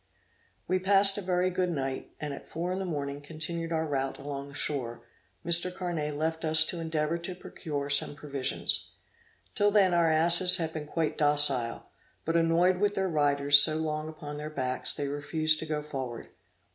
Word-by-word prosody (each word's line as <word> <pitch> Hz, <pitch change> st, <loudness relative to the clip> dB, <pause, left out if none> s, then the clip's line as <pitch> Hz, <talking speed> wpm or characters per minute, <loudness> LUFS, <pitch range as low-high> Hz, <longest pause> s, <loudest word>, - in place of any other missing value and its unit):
We 185 Hz, 0 st, 0 dB
passed 195 Hz, +1 st, +4 dB
a -, -, -5 dB
very 180 Hz, 0 st, 0 dB
good 180 Hz, 0 st, -1 dB
night, 135 Hz, -5 st, -4 dB
and 150 Hz, -2 st, -5 dB
at -, -, -11 dB
four 170 Hz, +2 st, -4 dB
in 185 Hz, -, -4 dB
the 190 Hz, -, -4 dB
morning 145 Hz, -4 st, -5 dB
continued 165 Hz, +2 st, -5 dB
our 160 Hz, -1 st, -1 dB
route 135 Hz, -3 st, -3 dB
along 140 Hz, 0 st, -7 dB
the 140 Hz, -, -13 dB
shore, 120 Hz, -6 st, -4 dB, 0.4 s
Mr. 170 Hz, +2 st, +5 dB
Carnet 170 Hz, -5 st, -4 dB
left 160 Hz, +2 st, -3 dB
us 155 Hz, 0 st, +5 dB
to 175 Hz, -, -4 dB
endeavor 160 Hz, 0 st, -2 dB
to 180 Hz, +2 st, -7 dB
procure 145 Hz, -5 st, -6 dB
some 140 Hz, +1 st, +2 dB
provisions. 140 Hz, -3 st, -1 dB, 0.6 s
Till 205 Hz, 0 st, +2 dB
then 200 Hz, -3 st, +3 dB
our 170 Hz, -1 st, +2 dB
asses 170 Hz, +3 st, +5 dB
had 160 Hz, -2 st, -3 dB
been 150 Hz, -2 st, -6 dB
quite 160 Hz, 0 st, -3 dB
docile; 145 Hz, -5 st, +1 dB, 0.4 s
but, 165 Hz, -, -2 dB
annoyed 170 Hz, +2 st, +2 dB
with 205 Hz, +1 st, 0 dB
their 190 Hz, -1 st, -1 dB
riders 145 Hz, -2 st, +5 dB
so 155 Hz, +1 st, +8 dB
long 155 Hz, -1 st, -3 dB
upon 150 Hz, -2 st, -9 dB
their 150 Hz, +1 st, -6 dB
backs, 130 Hz, -3 st, -3 dB
they 145 Hz, -, -4 dB
refused 155 Hz, +2 st, +1 dB
to 160 Hz, -, -6 dB
go 150 Hz, -1 st, -3 dB
forward. 130 Hz, -5 st, -7 dB
155 Hz, 185 wpm, -28 LUFS, 145-170 Hz, 0.6 s, so